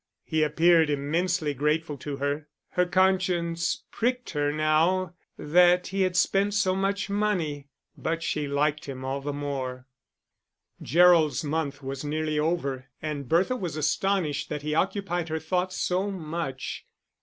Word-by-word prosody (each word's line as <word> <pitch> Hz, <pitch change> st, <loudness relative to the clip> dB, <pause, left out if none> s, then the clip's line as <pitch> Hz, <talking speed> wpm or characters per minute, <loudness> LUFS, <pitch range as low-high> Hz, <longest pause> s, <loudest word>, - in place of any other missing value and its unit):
He 160 Hz, -1 st, 0 dB
appeared 160 Hz, +1 st, +4 dB
immensely 155 Hz, +2 st, 0 dB
grateful 150 Hz, +2 st, 0 dB
to 140 Hz, +1 st, -5 dB
her. 145 Hz, +2 st, -2 dB, 0.2 s
Her 180 Hz, 0 st, +1 dB
conscience 180 Hz, -2 st, +1 dB
pricked 250 Hz, +1 st, -1 dB
her 145 Hz, -2 st, 0 dB
now 160 Hz, +4 st, +2 dB, 0.2 s
that 180 Hz, +3 st, +4 dB
he 195 Hz, +1 st, -1 dB
had 185 Hz, -1 st, +1 dB
spent 200 Hz, +3 st, +2 dB
so 190 Hz, -2 st, +2 dB
much 195 Hz, +1 st, -1 dB
money; 185 Hz, -9 st, -1 dB, 0.3 s
but 165 Hz, +1 st, -2 dB
she 150 Hz, -3 st, -1 dB
liked 145 Hz, +2 st, 0 dB
him 130 Hz, -2 st, -6 dB
all 135 Hz, +1 st, -2 dB
the 145 Hz, +1 st, -3 dB
more. 135 Hz, -3 st, -4 dB, 1.0 s
Gerald's 170 Hz, -2 st, +4 dB
month 145 Hz, -2 st, -2 dB
was 135 Hz, +1 st, -5 dB
nearly 155 Hz, +1 st, -1 dB
over, 140 Hz, -5 st, -1 dB
and 145 Hz, -4 st, -5 dB
Bertha 185 Hz, +9 st, +3 dB
was 180 Hz, -9 st, -4 dB
astonished 155 Hz, 0 st, 0 dB
that 150 Hz, -1 st, -4 dB
he 150 Hz, 0 st, -2 dB
occupied 175 Hz, -1 st, -1 dB
her 160 Hz, -, -1 dB
thoughts 180 Hz, +4 st, -1 dB
so 185 Hz, +3 st, 0 dB
much. 160 Hz, -7 st, -4 dB
160 Hz, 145 wpm, -27 LUFS, 145-180 Hz, 1.0 s, appeared